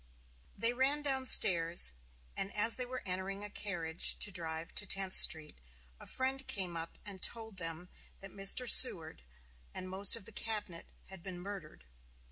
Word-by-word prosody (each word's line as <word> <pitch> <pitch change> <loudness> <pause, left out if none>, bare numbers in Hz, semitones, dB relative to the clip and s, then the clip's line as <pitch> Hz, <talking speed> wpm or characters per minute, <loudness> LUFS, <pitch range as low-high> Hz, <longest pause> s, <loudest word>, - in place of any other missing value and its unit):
They 230 +4 -1
ran 275 +4 -1
down 265 -2 -2
stairs, 170 - +4 0.4
and 195 - -2
as 225 +2 +3
they 250 -1 -5
were 255 0 -7
entering 190 +2 -5
a 205 - -7
carriage 170 -6 +1
to 205 - +2
drive 165 -2 -7
to 205 - -4
Tenth 190 -1 -1
Street, 155 - +4 0.4
a - - -13
friend 265 +1 -3
came 185 -4 -2
up 165 0 -8
and 195 -3 -10
told 220 -3 -1
them 165 0 -6 0.3
that 195 -1 -11
Mr. 195 +5 +4
Seward 165 - +5 0.5
and 185 - -6
most 190 +3 +1
of 215 -4 -11
the - - -13
cabinet 205 -6 -4 0.2
had 190 -2 -8
been 180 -1 -9
murdered. 180 - -10
195 Hz, 165 wpm, -32 LUFS, 170-225 Hz, 0.5 s, Seward